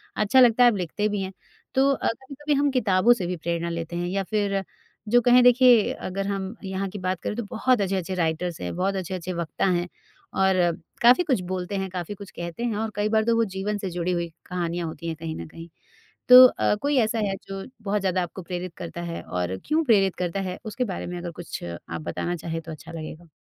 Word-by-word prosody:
अच्छा 215 +5 +3
लगता 245 -1 +6
है, 245 - +8
आप 205 - -2
लिखते 190 +4 -1
भी 205 -1 -2
हैं, 190 0 -5 0.4
तो 270 +1 +4
अ, 275 - -1
कभी-कभी 275 +5 -3
हम 285 0 +3
किताबों 220 -2 +4
से 195 -7 -4
भी 180 - -2
प्रेरणा 170 +1 -2
लेते 170 0 -4
हैं 175 0 -2
या 195 +2 -1
फिर 200 -2 0 0.5
जो 245 +2 +5
कहें 245 +1 +6
देखिए 245 -3 +6
अगर 195 +1 -4
हम 195 +1 -3
यहाँ 190 0 -3
की 205 - -7
बात 185 -1 -1
करें - - -3
तो 235 - -3
बहुत 240 0 +2
अच्छे-अच्छे 190 -1 -1
राइटर्स 170 0 -1
हैं, 90 - -4
बहुत 195 +2 0
अच्छे-अच्छे 185 -1 -4
वक्ता 170 +2 -2
हैं 175 -1 +1 0.5
और 190 0 +3 0.5
काफ़ी 245 +9 +6
कुछ 260 - +1
बोलते 185 +2 -3
हैं, 190 0 -2
काफ़ी 180 +1 -5
कुछ 200 0 -11
कहते 170 +6 -6
हैं। 235 -3 -1
और 220 +1 -1
कई 205 +1 0
बार 220 0 +3
तो 230 0 +3
वो 230 0 +3
जीवन 205 +2 -2
से 195 -2 -4
जुड़ी 175 0 -2
हुई 170 -1 -1 0.2
कहानियाँ 175 -1 -3
होती 165 +1 -7
हैं 165 - -2
कहीं 160 -1 -4
ना - - -6
कहीं, 165 +1 -11 0.6
तो 255 0 +12
अ, 250 - +2
कोई 285 0 +1
ऐसा 225 0 +1
है 195 - -1
जो 195 0 -5 0.2
बहुत 205 0 0
ज़्यादा 185 -1 +1
आपको 175 +2 -7
प्रेरित 180 0 -5
करता 170 0 -6
है 170 -1 -5
और 90 +1 -3
क्यों 315 +2 +2
प्रेरित 200 - +3
करता 180 +1 -2
है? 185 -1 -4
उसके 235 +4 -2
बारे 190 -5 -4
में 180 0 -5
अगर 175 -1 -5
कुछ 175 - -7
आप 85 -1 -6
बताना 130 - -3
चाहें 165 0 -4
तो 160 - -9
अच्छा 155 - -10
लगेगा। 165 +1 -8
190 Hz, 230 wpm, -25 LUFS, 175-220 Hz, 0.6 s, तो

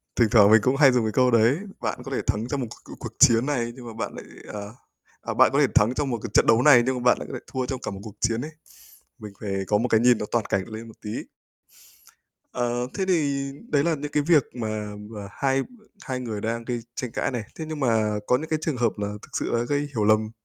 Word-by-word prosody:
thỉnh 115 -3 +3
thoảng 105 -3 +7
mình 110 - +7
cũng 130 +5 +2
hay 135 -1 +6
dùng 125 -3 +1
cái 110 - 0
câu 125 +3 +3
đấy. 115 +7 +4 0.2
Bạn - - -2
có - - -8
thể - - -1
thắng 110 +3 0
trong 140 +2 -2
một 120 - -3
c - - -14
c - - -8
cuộc - - -7
chiến 115 +2 +6
này, 120 -5 -1
nhưng 125 -2 -11
mà 115 - -7
bạn 110 - -4
lại, - - -9 0.3
à 105 - -4 0.6
à, - - -4
bạn - - +5
có - - +3
thể - - +5
thắng 110 +4 +4
trong 140 +1 -1
một 120 - -1
cái 115 - -4
trận - - +5
đấu 115 - +5
này, 130 -3 +7
nhưng 130 0 0
mà 125 - -4
bạn 125 - +5
lại - - -7
có - - -9
thể - - -7
thua 130 -1 -1
trong 130 -1 -4
cả - - -3
một 100 - -7
cuộc 105 -3 -10
chiến 115 +1 0
ấy. 155 +4 -6 0.7
Mình 105 -2 -9
phải 100 -2 -4
có 105 +1 +2
một 125 - 0
cái 110 -2 +3
nhìn 120 -1 +5
toàn 115 -3 +1
cảnh 95 -1 0
lên 110 +1 -8
một 110 - -13
tí. 105 - -4 1.4
Ờ, 120 0 -1
thế 190 - -1
thì 140 -6 +1 0.2
đấy 145 -1 +2
là 170 - +2
những 150 0 -6
cái 150 - +2
việc 150 -2 +4
mà 110 -3 -4 0.2
mà 105 -3 -7
hai 135 +3 0
b - - -9 0.4
hai 130 -2 -3
người 110 -4 -4
đang 115 +2 -3
gây 120 0 -3
tranh 125 -2 -5
cãi - - -1
này, 120 -3 -3
thế 160 - -6
nhưng 155 -2 -5
mà 110 -5 +1
có 125 - +3
những 160 +3 -6
cái 155 - +1
trường 155 -5 -1
hợp 120 -2 +1
là 105 0 -3
thực - - -13
sự - - -2
là 120 0 +1
gây 145 +3 0 0.2
hiểu 105 - +1
lầm, 110 0 +3
120 Hz, 275 wpm, -25 LUFS, 110-135 Hz, 1.4 s, thoảng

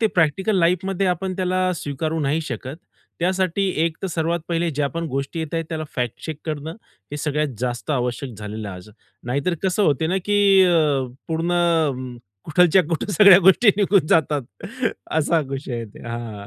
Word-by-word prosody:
ते 220 - +4
प्रॅक्टिकल 190 +3 +1
लाईफमध्ये 185 +3 +1
आपण 185 +1 -1
त्याला 185 0 0
स्वीकारू 155 +2 -3
नाही 150 +3 0
शकत. 130 -1 -6 0.4
त्यासाठी 185 +1 0 0.2
एक 165 -1 -2
तर 195 - -1
सर्वात 170 +1 -1
पहिले 170 0 0
ज्या 145 0 -1
पण 165 +2 -4
गोष्टी 140 +4 -3
येत 160 0 -5
आहेत 165 - -1
त्याला 160 -1 -4
फॅक्ट 120 -3 -3
चेक 160 -2 -5
करणं, 155 0 -4 0.4
हे 145 - -4
सगळ्यात 150 0 -1
जास्त 125 +3 -3
आवश्यक 125 -1 -2
झालेलं 105 0 -6
आहे 95 - -7
आज. 90 +3 -12 0.4
नाही 125 +4 -1
तर 180 - +2
कसं 190 +2 +1
होत 145 -5 +2
ना 190 - +1
की 205 0 +2 0.2
अ, 155 -7 +2 0.2
पूर्ण 160 -6 0 0.3
कुठलच्या 180 +3 +4
कुठे 175 +4 -2
सगळ्या 195 +1 +8
गोष्टी 195 +5 +5
निघून 195 -5 +3
जातात 150 -3 +2 0.7
असा 160 +1 +2
विषय 135 -2 -5
आहे 115 -1 -4
ते - - -12
हां. 115 -4 -6
160 Hz, 175 wpm, -22 LUFS, 140-180 Hz, 0.7 s, सगळ्या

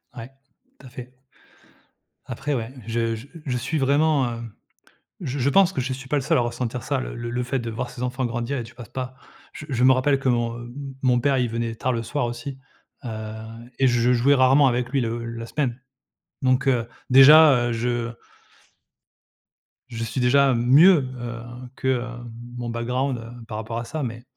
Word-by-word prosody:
Ouais, 115 +1 -8 0.5
tout 135 - -13
à - - -12
fait. 125 0 -10 1.1
Après 135 +4 -3
ouais, 115 -2 -3 0.2
je 115 0 -1
je 115 +5 -10 0.2
je 125 -3 -1
suis 130 +7 -2
vraiment, 145 0 +3
heu 115 - -6 0.8
je 135 +2 -4
je 130 +1 +1
pense 190 +5 +4
que 170 - -2
je 130 +1 -2
suis 135 +1 -10
pas 150 - 0
le 140 - +1
seul - - +2
à - - +3
ressentir 120 0 -3
ça, - - -1
le - - -6
le 120 0 -5
le 125 +1 -2
fait 125 +2 -2
de 115 -2 -4
voir 115 +2 -4
ses 120 - -8
enfants 125 +1 -1
grandir 120 +3 -3
et 120 - -3
tu 115 +1 -12
passes 120 -3 -11
pas. 130 0 -5 0.4
Je - - -8
je 125 -1 +1
me 130 - +7
rappelle 135 +2 +2
que 135 - -2
mon, 120 -1 0
heu, 120 - -8
m 120 - -10 0.3
mon 125 -2 +3
père, 135 +1 +2
il 125 -2 +1
venait 115 0 -3
tard 130 +3 -1
le 115 -1 -2
soir 120 +3 -2
aussi, 120 +3 -6 0.5
heu - - -4 0.7
et 135 - +4
je 120 0 +3
jouais 130 +4 +4
rarement 135 +2 +5
avec 125 0 -1
lui 140 0 +1
le 115 0 -3
la 115 0 -6
semaine. 130 -3 -2 0.6
Donc, 130 +1 +2
heu, 120 -3 +2 0.2
déjà, 135 -1 +8
heu, 120 - -1
je 120 0 -2 1.8
je 115 -2 -5
suis 125 +3 -3
déjà 135 +2 +4
mieux, 135 +5 +5
heu, 120 0 -5 0.4
que, 130 - -4
heu, 125 -2 +1 0.5
mon 120 -1 -4
background, 125 +3 -1
heu, 115 +1 -10
par 110 - -5
rapport 110 +1 -5
à 120 - -5
ça. 155 +4 -4
Mais, 115 -1 -5
125 Hz, 205 wpm, -23 LUFS, 120-135 Hz, 1.8 s, déjà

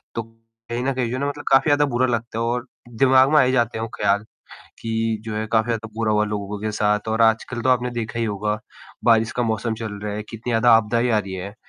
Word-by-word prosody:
तो 115 - -2
कहीं 115 +1 -9
न 135 - +1
कहीं 125 -3 -1
जो 125 - -3
है - - -3
ना 140 - 0
मतलब 145 +1 -7
काफ़ी 135 +2 +5
ज़्यादा 145 0 +4
बुरा 125 +2 +3
लगता 115 -1 -2
है - - 0
और 120 +1 -1 0.3
दिमाग 130 0 +5
में 155 - +5
आ - - +7
ही 130 - +2
जाते 120 -3 +1
हैं 110 - -3
वो 115 - -5
ख्याल, 100 0 +1 0.6
कि 115 -1 -1
जो 110 -1 -4
है 110 +1 -2
काफ़ी 110 0 +4
ज़्यादा 115 -1 -2
बुरा 110 -1 0
हुआ 105 0 +2
लोगों 105 -1 -4
के 110 0 -2
साथ 105 0 0
और 110 +1 +1
आजकल 115 +2 +2
तो 130 - +2
आपने 125 -1 +2
देखा 115 -1 -4
ही 115 - +1
होगा, 105 0 -2 0.5
बारिश 115 -1 +4
का 120 - +2
मौसम 110 0 -1
चल 110 -2 -5
रहा 105 -1 -3
है, 105 - -4
कितनी 115 +2 -5
ज़्यादा 115 +1 +4
आपदाएँ 115 +2 +1
आ 110 - +3
रही 100 -2 -6
हैं। 100 +2 -6
115 Hz, 260 wpm, -22 LUFS, 110-120 Hz, 0.6 s, आ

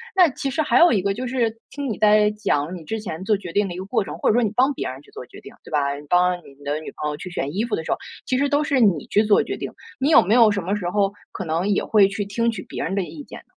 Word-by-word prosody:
那 360 -4 +6
其 270 +1 -4
实 310 +4 0
还 - - +2
有 345 - +7
一 200 - +2
个 195 +1 -1
就 250 +4 -4
是 235 -3 -1
听 285 -2 -4
你 205 - -4
在 210 0 +5
讲 185 -6 -1
你 165 - -11
之 220 +7 -4
前 185 -4 -6
做 210 +1 +3
决 185 -3 -7
定 200 +2 +1
的 175 - -6
一 - - -8
个 190 - -5
过 195 - 0
程， - - -7
或 - - +2
者 - - +4
说 245 - +3
你 210 - 0
帮 265 +3 +3
别 - - -3
人 130 +1 -7
去 - - -22
做 - - -9
决 - - -14
定， - - -12
对 - - -14
吧？ 140 -1 0
你 145 +1 -10
帮 180 +1 +3
你 140 -4 -17
的 145 +2 -2
女 155 - -9
朋 150 - -1
友 150 - -4
去 180 +1 -8
选 145 -1 -4
衣 220 - 0
服 235 - -1
的 160 - -4
时 - - -4
候， - - +1 0.3
其 255 - +1
实 285 +1 +2
都 290 +1 +1
是 280 -3 +1
你 190 - +2
去 210 - +3
做 210 -1 +4
决 - - -5
定。 - - -6 0.3
你 280 +4 +1
有 - - +8
没 205 +6 +2
有 230 -3 +6
什 200 -2 -1
么 190 +4 -1
时 185 -4 -3
候 200 -1 +1 0.2
可 190 - -5
能 165 +4 -1
也 200 - +1
会 205 -3 +4
去 200 +1 -3
听 230 +4 -1
取 205 -5 -6
别 - - -4
人 185 - -3
的 200 - 0
意 155 -4 -8
见 - - -11
呢？ - - -19
200 Hz, 360 characters per minute, -22 LUFS, 175-230 Hz, 0.3 s, 有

